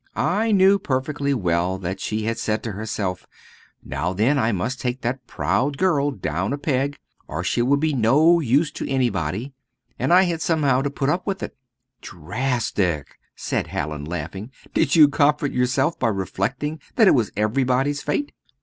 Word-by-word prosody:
I 220 +5 +1
knew 195 0 +5
perfectly 140 +1 -1
well 90 -6 0
that 95 +1 -4
she 110 +2 -2
had 115 +1 -2
said 110 0 -1
to 115 - -3
herself, 100 -3 -4 0.6
'Now 90 - -2
then 120 +9 +2
I 115 -2 +2
must 115 +7 -2
take 125 +1 -2
that 125 +1 -3
proud 140 +2 0
girl 145 -6 +2
down 95 - -2
a - - -2
peg, 140 -1 -1 0.3
or 80 +4 -4
she 95 +6 0
will 135 +4 +3
be 155 +1 0
no 145 +8 +4
use 145 +2 +2
to - - -5
anybody;' 120 - -1 0.5
and - - 0
I 180 +2 +7
had 170 -3 -1
somehow 145 -6 +2
to 140 - -1
put 140 0 -2
up 175 +7 -1
with 195 -2 -2
it." - - -6 0.5
"Drastic!" 90 - -2 0.2
said - - -2
Hallin, 75 0 -4
laughing; 90 +6 -5 0.2
"did 160 -1 +2
you 155 -3 +8
comfort 145 0 +2
yourself 130 +5 0
by 125 - +1
reflecting 115 - -2 0.2
that 220 -4 +5
it - - +7
was 120 -6 +1
everybody's 130 +6 +1
fate?" 290 - -2
130 Hz, 170 wpm, -22 LUFS, 100-145 Hz, 0.6 s, you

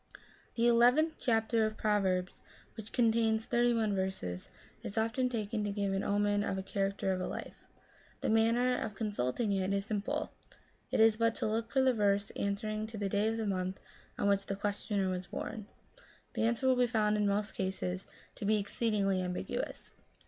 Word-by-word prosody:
The 230 - +2
eleventh 250 +7 +4
chapter 225 -2 +2
of 215 - -6
Proverbs, 190 -4 0 0.3
which 220 -1 -9
contains 225 -2 +2
thirty 240 0 +2
one 220 -3 +1
verses, 190 - -3 0.3
is 200 - -6
often 225 +3 +1
taken 220 -2 -2
to 205 - -1
give 200 -1 -1
omen 205 +1 +1
of 195 - -1
the 190 - -3
character 195 0 -1
of 185 - -3
a - - -2
life. - - -7 0.5
The - - 0
manner 230 +3 +3
of 215 -2 -4
consulting 205 - -1
it 190 0 0
is 200 0 -1
simple; 210 -1 -2 0.6
it - - 0
is 220 -1 +6
but 230 0 +2
to - - -2
look 225 +1 -1
for 265 - +3
the 260 -1 +4
verse 205 -2 +1
answering 215 +2 -2
to 220 0 -8
the 200 -1 -1
day 205 +2 +1
of 225 0 0
the 225 - -2
month 185 -1 -2 0.4
on - - 0
which 200 -1 +2
the 195 - -2
questioner 200 0 -1
was 185 -1 -3
bom. 210 -2 -5 0.7
The - - 0
answer 235 +3 -1
will 260 - +5
be 250 -1 +3
found 215 -2 +2
in 210 -1 +2
most 205 +1 0
cases 190 -1 -3 0.3
to - - -7
be 215 +1 +3
exceedingly 200 -2 0
ambiguous. 180 - -4
210 Hz, 185 wpm, -32 LUFS, 195-225 Hz, 0.7 s, is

